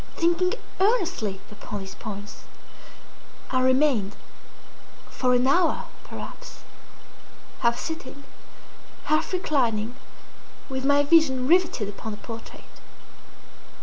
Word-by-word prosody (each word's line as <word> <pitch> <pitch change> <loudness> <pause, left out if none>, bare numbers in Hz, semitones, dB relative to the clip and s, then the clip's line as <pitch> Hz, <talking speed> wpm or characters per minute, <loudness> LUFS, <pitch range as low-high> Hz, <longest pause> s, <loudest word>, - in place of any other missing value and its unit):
Thinking 345 +4 +2 0.2
earnestly 360 - +1
upon 205 0 -6
these 195 0 -8
points, 205 0 -8 1.1
I 255 -1 +2
remained, 255 -6 +3 1.0
for 250 -1 +2
an 250 +1 +3
hour 330 +5 +3 0.2
perhaps, - - -9 1.0
half 235 -1 +2
sitting, 285 -2 -6 0.8
half 310 - +1
reclining, 245 - +1 0.8
with 265 0 -3
my 285 +1 +5
vision 285 -5 +4
riveted 340 - +3
upon 205 +2 -6
the - - -7
portrait. 230 +1 -9
260 Hz, 95 wpm, -26 LUFS, 220-325 Hz, 1.1 s, my